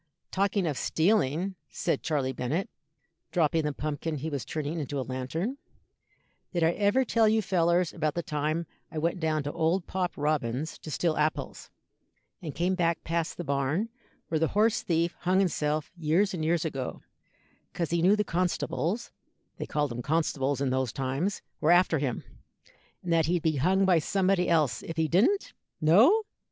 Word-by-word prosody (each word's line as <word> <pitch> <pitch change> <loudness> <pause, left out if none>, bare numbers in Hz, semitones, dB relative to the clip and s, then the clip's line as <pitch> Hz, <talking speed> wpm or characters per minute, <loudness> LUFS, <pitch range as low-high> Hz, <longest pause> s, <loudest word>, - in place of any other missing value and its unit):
"Talking 195 0 +1
of 150 -5 -1
stealing," 180 0 +1 0.2
said - - -1
Charley 140 -5 -1
Bennet, 145 +10 -2 0.6
dropping 165 -1 +2
the 150 - 0
pumpkin 155 +2 -3
he 155 +3 -4
was 140 -3 -3
turning 155 +1 -3
into 145 -1 -3
a 130 - -2
lantern, 160 - -3 0.9
"did 175 -3 0
I 165 - +4
ever 205 +8 +2
tell 225 -2 +3
you 220 +1 +3
fellers 175 -1 +2
about 155 -3 -1
the 170 - -2
time 155 +3 -1 0.3
I 160 - -6
went 170 +4 0
down 155 -2 0
to 145 - -3
old 165 +3 0
Pop 180 -1 -2
Robins's 145 -1 -1
to - - -9
steal 160 +1 0
apples, 155 +1 -2 0.7
and 155 -5 -6
came 180 +2 +1
back 170 -2 0
past 165 0 -2
the 175 - -4
barn 140 +8 0 0.4
where 160 - +1
the 160 - +2
horse 225 +2 +3
thief 170 0 0
hung 185 +1 +1
himself 155 -5 0
years 170 +5 +1
and 165 -4 -3
years 165 +1 +1
ago, 135 -5 -4 0.7
'cause 170 -2 -3
he 170 -1 +1
knew 190 +4 +5
the 210 - +1
constables 180 +3 -1 0.5
they - - -5
called 150 -3 -1
'em 120 - -4
constables 145 -2 0
in 135 -2 +1
those 130 -2 0
times 135 - -2 0.2
were 155 - +1
after 175 -3 +5
him, 130 -4 -2 0.8
and 175 -2 0
that 165 -2 +3
he'd 175 -1 +1
be 160 -3 +1
hung 190 +8 +3
by 180 -3 +5
somebody 185 +2 +1
else 155 -9 +2
if 165 - -7
he 160 -1 +2
didn't? 220 - +2 0.3
No? 225 - +5
165 Hz, 175 wpm, -28 LUFS, 150-180 Hz, 0.9 s, knew